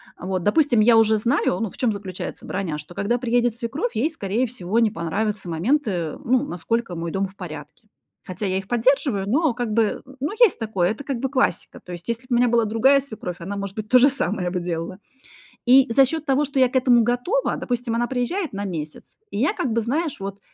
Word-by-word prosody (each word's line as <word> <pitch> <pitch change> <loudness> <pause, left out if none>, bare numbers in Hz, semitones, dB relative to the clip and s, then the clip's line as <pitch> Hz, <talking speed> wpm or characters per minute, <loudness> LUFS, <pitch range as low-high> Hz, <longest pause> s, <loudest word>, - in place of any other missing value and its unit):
А, 180 - -9
вот, 185 -2 -1
допустим, 245 - +3
я 225 +1 +6
уже 220 -1 +5
знаю, 230 -4 +1
ну, 225 - -1
в - - -16
чём 240 -4 +1
заключается 190 -3 -7
броня: 185 -5 -3
что 150 +3 -8
когда 225 +5 0
приедет 240 -1 +1
свекровь, 270 - -3
ей, 270 +8 +1
скорее 225 -4 -1
всего, 220 -2 -2
не 225 -2 +3
понравятся 200 +2 -3
моменты, 180 - 0
ну, 260 +1 +2
насколько 225 +1 -2
мой 165 0 -4
дом 195 +2 -1
в 190 - -18
порядке. 170 +3 -9 0.4
Хотя 185 +2 -5
я 190 -1 0
их 190 0 -5
поддерживаю, 240 -3 +1
но, 290 +5 +2
как 235 -2 -3
бы, 220 -1 +1 0.2
ну, 290 - 0 0.2
есть 420 - -1
такое. 195 -6 0
Это, 225 +6 -6
как 270 -3 -3
бы, 270 - -1
классика. 265 -1 -1
То 180 - -10
есть, 175 -1 -8
если 235 0 -2
б - - -19
у - - +4
меня 245 +1 +4
была 235 -1 +3
другая 260 +6 +4
свекровь, 215 -10 -7
она, 200 +4 -5
может 200 0 -5
быть, 215 -1 -6
то 255 - +7
же 260 - +6
самое 200 -8 -1
бы 180 0 -2
делала. 170 +2 -4 0.7
И 260 +2 +6
за 270 +2 +6
счёт 320 +2 -4
того, 280 +1 +2
что 280 -1 -2
я 260 - +6
к 255 - -11
этому 245 -2 +4
готова, 245 - 0
допустим, 245 -1 -2
она 240 +1 0
приезжает 265 - -2
на 200 +1 -3
месяц, 160 -5 -7
и - - -4
я, 285 - +2
как 270 - -2
бы 230 +1 +1
знаешь, 290 +7 -2
вот, 195 0 -6
225 Hz, 230 wpm, -23 LUFS, 190-255 Hz, 0.7 s, то